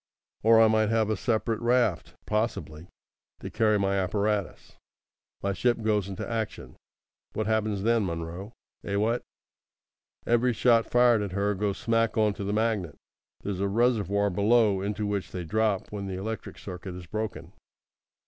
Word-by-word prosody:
Or 115 +1 +6
I 115 - +7
might 110 -1 +2
have 110 -1 +1
a - - +1
separate 110 +1 -1
raft, 120 -7 +1
possibly, 105 -7 -2 0.5
to - - -7
carry 110 -1 +2
my 100 -1 +1
apparatus. 100 +1 -2 0.7
My 100 0 0
ship 120 +3 0
goes 105 -3 +1
into 95 - -5
action. 110 - -4 0.6
What 110 - -2
happens 110 -2 0
then, 115 0 +3
Munro? 85 +4 -5 0.3
Eh, 100 - -3
what! 110 +4 +1 1.0
Every 120 +1 +2
shot 115 -1 +3
fired 120 -2 +4
at 100 -3 -4
her 100 +1 +1
goes 100 0 -2
smack 115 0 0
on 105 -1 +3
to 100 - -6
the 100 - -2
magnet. 105 -7 -1 0.5
There's 100 -2 -3
a 100 - +1
reservoir 100 -2 +1
below 105 0 +3
into 105 +2 -2
which 100 -2 -3
they 90 - -4
drop 105 +3 0
when 100 -2 -5
the 95 - -4
electric 110 +4 -5
circuit 90 -1 -8
is 90 -1 -9
broken. 110 +5 -5
105 Hz, 160 wpm, -27 LUFS, 100-115 Hz, 1.0 s, I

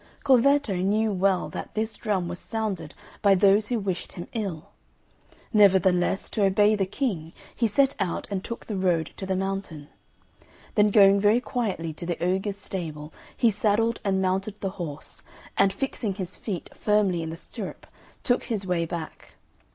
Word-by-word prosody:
Corvetto 275 -3 +4
knew 210 +4 +1
well 190 -1 +1
that - - -7
this 220 +1 -1
drum 195 -6 -1
was 175 0 -5
sounded 200 -8 -4 0.3
by 200 -2 +5
those 200 +2 +4
who 245 - 0
wished 195 -4 -3
him 175 - -7
ill; 195 -8 -4 0.8
nevertheless, 190 -3 +4
to 210 - -1
obey 205 +2 +4
the 195 -2 0
King, 190 - -3 0.2
he 235 - +2
set 270 +6 +2
out 185 -4 -2
and 195 -1 -2
took 235 - -6
the 215 - -4
road 175 -4 +1
to 190 - -6
the 190 - 0
mountain. 190 -6 -4 0.8
Then 210 0 +4
going 200 -1 +6
very 210 +4 +4
quietly 200 -10 -3
to 170 +2 -8
the 175 - -1
ogre's 190 +3 -1
stable, 155 -6 -6 0.2
he 235 - +4
saddled 220 +3 +1
and 195 -2 +1
mounted 195 +3 -1
the 195 - -2
horse, 150 -3 -7 0.3
and 195 0 +4
fixing 210 -2 -3
his 185 -2 -5
feet 190 -6 -5
firmly 205 -5 +2
in 160 - -4
the 165 - -6
stirrup, - - -8 0.4
took 245 - +1
his 210 -4 -2
way 175 -2 0
back. 165 -2 -7
195 Hz, 165 wpm, -26 LUFS, 180-215 Hz, 0.8 s, going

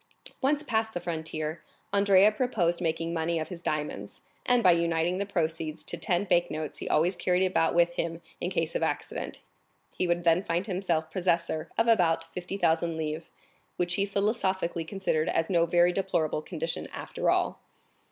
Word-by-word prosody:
Once 290 +3 +2
past 220 -5 -1
the - - 0
frontier, 160 -2 -4 0.3
Andrea 200 0 +6
proposed 210 -8 0
making 165 0 -1
money 165 0 0
of 155 - -3
his 175 -3 -7
diamonds; 155 -3 -3 0.3
and 245 -1 +4
by 185 - +7
uniting 170 +1 +1
the 200 - -2
proceeds 160 -4 -2
to - - -3
ten 175 +1 0
bank 175 -3 +2
notes 155 -1 -4
he - - -5
always 175 +5 +3
carried 180 +1 +2
about 170 -3 +1
with 175 0 +4
him 165 -1 -3 0.2
in - - -2
case - - -1
of - - -1
accident, - - -3 0.5
he 180 - 0
would 175 0 +1
then 170 +1 +4
find 175 -1 -1
himself 175 -5 -1
possessor 170 -3 0
of 225 - +4
about 165 -6 +2
50,000 170 -3 0
livres, 155 +1 -4 0.5
which 175 0 0
he 200 +2 +1
philosophically 195 -4 0
considered 165 -4 -1
as 165 +3 0
no 170 -2 +3
very 175 +1 +4
deplorable 175 -5 0
condition 165 0 -4
after - - -2
all. - - +1
175 Hz, 170 wpm, -28 LUFS, 165-190 Hz, 0.5 s, by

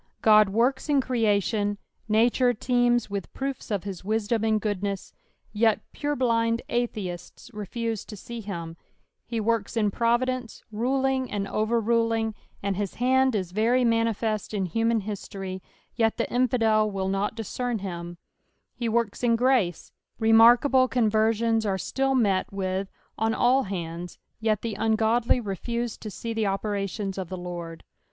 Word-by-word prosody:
Ood 215 -2 +7
works 245 +8 +1
in 285 -2 +4
ere 240 -4 +1
at 205 +1 +2
ion— 205 -1 0 0.3
nature 240 +3 +3
teema 245 +1 +2
with 200 -2 -4
proofs 270 -2 -4
of 205 -4 -1
his 195 -3 -6
wisdom 220 +2 0
and 220 -1 +2
goodness, 200 -2 -3 0.4
yet 220 0 +2
purblind 235 -5 0
atheists 215 -4 -4
refuse 220 +1 -3
to 210 - -9
see 235 +4 -7
him: 170 -5 -6 0.5
he 230 -1 -2
works 225 0 -1
in 210 -2 +2
providence, 240 +2 0
ruling 260 +3 0
and 200 -1 -2
overruling, 225 0 +1 0.3
and 195 -2 -1
his 200 -2 -3
hand 260 0 +3
is 185 -4 -2
very 235 +5 +2
manifest 225 -2 0
in 195 -2 0
human 225 +4 +1
history, 195 -2 -6 0.3
yet 225 -2 +1
the - - 0
infidel 225 -4 +3
will 195 -2 -2
not 195 +2 -1
discern 235 +2 -3
him: 175 -3 -6 0.6
ho 235 - 0
works 230 0 -1
in 235 -1 +4
grace 235 -8 +1
— - - -53
remarkable 240 +4 +6
conversions 225 -1 +2
are 195 -3 0
still 270 +7 0
met 200 -7 +1
with 190 0 -2 0.3
on 225 +1 +1
all 260 +2 +3
hands, 175 -2 -5 0.2
yet 220 -2 0
the 225 -3 -3
uitgodly 225 +2 +2
refuse 235 +4 -3
to 215 - -8
see 230 +3 -5
the 220 -2 0
operations 195 0 -2
of 185 -3 -5
the 185 - -5
Lord. 175 -2 -7
220 Hz, 150 wpm, -26 LUFS, 200-235 Hz, 0.6 s, Ood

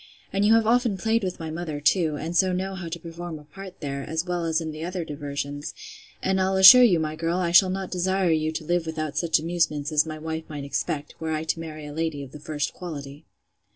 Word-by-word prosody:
And 195 +1 +1
you 215 +2 +6
have 225 -1 +3
often 235 -2 +2
played 225 +2 +1
with 185 -1 -3
my 160 -1 -5
mother, 160 -2 -4
too, 155 +1 +2
and 165 +4 -5
so 185 +1 +4
know 190 +2 -2
how 190 -3 -6
to 165 +1 -4
perform 170 0 -7
a 150 - -13
part 190 +5 -11
there, 140 -2 -3
as 160 +4 -3
well 175 -2 -2
as 160 0 +1
in 160 -1 -4
the 155 +1 -7
other 175 0 -3
diversions: 145 -1 -5 0.5
and 190 0 +1
I'll 190 +1 +1
assure 190 +7 +10
you, 200 -9 +5
my 155 -1 -2
girl, 165 +2 -1
I 175 -2 0
shall 185 +2 +7
not 190 0 -4
desire 185 0 +1
you 155 0 +1
to 160 0 -5
live 175 0 0
without 155 -2 -3
such 160 +2 +2
amusements, 160 -2 -1
as 155 -1 +4
my 155 0 -5
wife 160 +1 -5
might 145 -2 -6
expect, 145 +2 -3
were 160 -1 -2
I 155 0 -2
to 160 +1 -2
marry 155 -2 -7
a 145 - -8
lady 160 -2 -2
of 135 - -11
the 150 - -10
first 150 0 -3
quality. 145 -4 -8
165 Hz, 245 wpm, -25 LUFS, 155-185 Hz, 0.5 s, assure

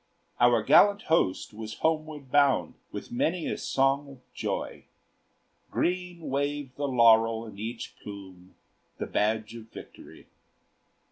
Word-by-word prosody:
Our 120 -2 +4
gallant 205 - +5
host 95 - +1
was 110 0 -7
homeward 155 -4 -2
bound 140 - +3 0.2
With - - -7
many 160 +7 0
a - - -1
song 135 +1 +1
of 135 -2 -17
joy; - - -4 0.8
Green 180 -1 -2
waved 140 -1 -2
the 145 0 -2
laurel 115 -2 +4
in 105 -3 -11
each 115 +2 -6
plume, 95 -3 -11 0.4
The - - -3
badge 110 +1 -1
of 115 -1 -10
victory. - - -13
125 Hz, 125 wpm, -28 LUFS, 110-145 Hz, 0.8 s, gallant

